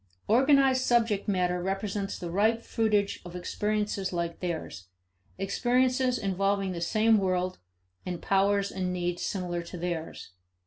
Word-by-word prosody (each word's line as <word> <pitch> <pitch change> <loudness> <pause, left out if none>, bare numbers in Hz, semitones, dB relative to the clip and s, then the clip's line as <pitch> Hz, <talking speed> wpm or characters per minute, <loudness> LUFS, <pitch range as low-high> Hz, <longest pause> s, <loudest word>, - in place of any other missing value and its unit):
Organized 265 +2 +4
subject 230 -5 +2
matter 180 -3 +1
represents 195 +1 -2
the 175 -2 -6
ripe 220 +5 +2
fruitage 210 -3 0
of 175 -1 -9
experiences 210 +1 -2
like 170 -1 -3
theirs, 160 - -5 0.5
experiences 250 +5 +1
involving 195 0 0
the 170 -2 -5
same 215 +4 +3
world, 185 -1 -1 0.4
and 180 -2 -4
powers 200 0 +2
and 185 -1 -2
needs 175 -1 -2
similar 175 -3 -2
to 170 +1 -8
theirs. 165 - -5
195 Hz, 130 wpm, -28 LUFS, 180-215 Hz, 0.5 s, Organized